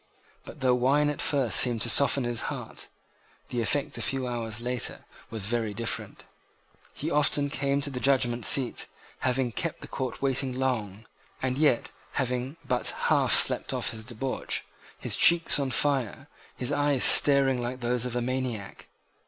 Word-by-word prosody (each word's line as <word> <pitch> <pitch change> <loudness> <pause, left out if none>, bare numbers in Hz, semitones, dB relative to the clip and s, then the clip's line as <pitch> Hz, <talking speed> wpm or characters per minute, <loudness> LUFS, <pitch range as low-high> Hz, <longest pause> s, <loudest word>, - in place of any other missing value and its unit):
But - - -12
though 130 -1 +3
wine 140 +4 +2
at 145 - -6
first 135 -5 +2
seemed 120 -4 +4
to 120 - +1
soften 140 +3 +4
his 120 -1 -2
heart, - - -6 0.6
the 120 - -2
effect 140 +5 -2
a - - -4
few 135 -1 -1
hours 115 -3 -3
later 125 0 -3 0.2
was 110 -4 -2
very 110 -1 -2
different. 115 +1 -5 0.7
He 155 +3 -4
often 145 -1 +2
came 140 0 -1
to 140 - -2
the 125 - -5
judgment 125 -3 +1
seat, 135 -1 +2 0.3
having 130 -1 -1
kept 165 +7 -4
the - - -8
court 130 -5 -5
waiting 135 -1 -1
long, 110 -6 -3 0.3
and 130 -1 -2
yet 145 -4 +1 0.2
having 130 +3 -3
but 125 -1 0 0.2
half - - +3
slept - - +5
off - - -1
his 110 -1 -8
debauch, 125 +3 -4 0.3
his - - -3
cheeks 170 -3 +4
on 140 -2 -1
fire, 135 -3 -1 0.3
his 125 +3 -3
eyes 145 -2 +1
staring 135 -3 +6
like 125 +1 -5
those 120 0 0
of 120 - -6
a 120 - -1
maniac. 125 -5 -5
130 Hz, 165 wpm, -27 LUFS, 120-140 Hz, 0.7 s, staring